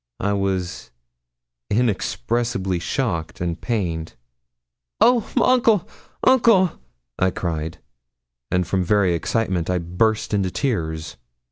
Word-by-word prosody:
I 100 +1 0
was 95 -3 -2 0.8
inexpressibly 105 - 0
shocked 85 -4 -2
and 85 -1 -3
pained. 85 -9 -2 0.8
'Oh, 240 -3 +4
uncle! 230 -6 +3 0.4
uncle!' 225 -8 +5 0.5
I 95 - +3
cried, 80 -3 -3 0.7
and 90 0 +1
from 95 +1 0
very 95 -1 +3
excitement 90 -1 -1
I 90 - +1
burst 95 +7 0
into 100 -2 +1
tears. 80 - -2
95 Hz, 100 wpm, -22 LUFS, 85-120 Hz, 0.8 s, uncle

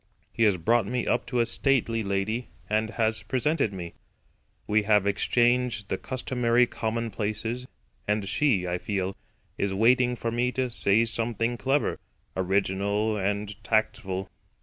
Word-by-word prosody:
He - - -4
has 100 -3 +3
brought 115 +5 +2
me 125 +2 -1
up 120 - 0
to 125 -2 +1
a - - +2
stately 115 -2 +1
lady, 105 +4 -1 0.2
and 110 +1 0
has 110 -1 0
presented 135 -2 0
me. 90 -3 -7 0.7
We 110 +1 +3
have 105 -1 +3
exchanged 120 +1 +1
the - - -1
customary 125 -1 +1
commonplaces, 115 +1 -3 0.4
and 105 -1 0
she, 100 -4 +2
I 90 0 -1
feel, 95 -1 -2 0.4
is 100 -1 0
waiting 125 +3 +4
for 115 -1 -3
me 120 +2 +1
to 130 -2 -1
say 110 +1 +3
something 115 0 -1
clever, 135 +6 0 0.4
original 100 +3 0
and 100 +1 -2
tactful. 110 -4 0
110 Hz, 140 wpm, -27 LUFS, 100-120 Hz, 0.7 s, waiting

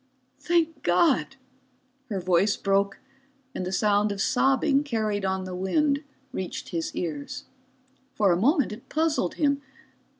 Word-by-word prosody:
"Thank 330 -1 +1
God!" 265 - +2 0.7
Her 200 -3 -2
voice 185 +3 +2
broke, 195 0 +1 0.6
and 185 - -3
the - - -3
sound 205 +1 +2
of 200 - -4
sobbing 270 +5 +2
carried 215 -6 -1
on 190 0 -1
the 185 0 -6
wind 280 +11 +1 0.3
reached 185 -1 -5
his 165 -1 -3
ears. 150 -5 -4 0.7
For 200 -3 +3
a - - +4
moment 280 - +3
it 215 +3 -10
puzzled 310 - 0
him. 280 -2 +1
210 Hz, 135 wpm, -26 LUFS, 190-280 Hz, 0.7 s, a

